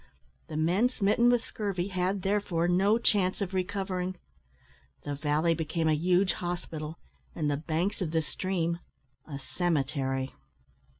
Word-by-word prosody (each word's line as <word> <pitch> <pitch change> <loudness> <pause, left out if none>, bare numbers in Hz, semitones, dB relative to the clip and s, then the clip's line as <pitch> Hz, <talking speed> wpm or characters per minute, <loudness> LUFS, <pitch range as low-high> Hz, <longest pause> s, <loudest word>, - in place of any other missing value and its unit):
The 155 - -5
men 180 +10 +3
smitten 235 +1 +3
with 245 -2 +3
scurvy 195 -3 -2
had, 185 +1 0
therefore, 195 -4 +1
no 195 +5 +4
chance 195 -5 +2
of 195 -2 -2
recovering. 185 -1 -1 0.9
The 145 - -3
valley 150 +3 +2
became 160 0 -1
a 155 - +4
huge 180 +4 +3
hospital, 165 -3 -4 0.4
and 150 -3 0
the 140 - +1
banks 165 +7 -1
of 175 - 0
the 160 0 +1
stream 170 +2 -1 0.5
a 145 -3 -5
cemetery. 135 -4 -1
175 Hz, 135 wpm, -29 LUFS, 155-195 Hz, 0.9 s, no